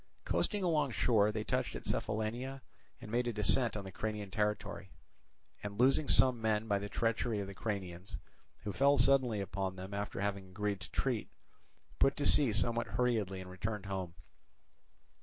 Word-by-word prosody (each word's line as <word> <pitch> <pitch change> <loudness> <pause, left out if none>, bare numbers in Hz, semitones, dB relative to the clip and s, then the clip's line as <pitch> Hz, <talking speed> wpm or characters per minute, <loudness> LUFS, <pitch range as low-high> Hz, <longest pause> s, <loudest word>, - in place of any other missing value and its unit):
Coasting 205 -3 0
along 155 -5 +1
shore 110 -3 +2
they 110 0 -3
touched - - -2
at - - -7
Cephallenia 120 +5 -2 0.4
and 115 -4 -10
made 120 +1 0
a 120 - -1
descent 110 +2 +4
on 105 - -5
the 95 - -8
Cranian 105 -2 -4
territory, 105 -2 -2 0.7
and 100 -1 -6
losing 135 +4 +4
some 125 -3 +5
men 110 0 0
by 100 -2 +1
the 100 +1 -6
treachery 115 -1 -1
of 100 - -3
the 100 - -8
Cranians, 95 -3 -5 0.5
who 105 - -4
fell 140 +6 +4
suddenly 125 -4 +4
upon 95 0 -3
them 95 +2 -8
after 100 0 -4
having 100 -1 -3
agreed 100 +1 -2
to 90 - -9
treat, - - -2 0.7
put 135 - +4
to 145 - -2
sea 140 -6 +6
somewhat 115 +3 +2
hurriedly 110 -7 -1
and 90 0 -10
returned 105 +2 -4
home. 95 -3 -4
105 Hz, 170 wpm, -33 LUFS, 100-120 Hz, 0.7 s, sea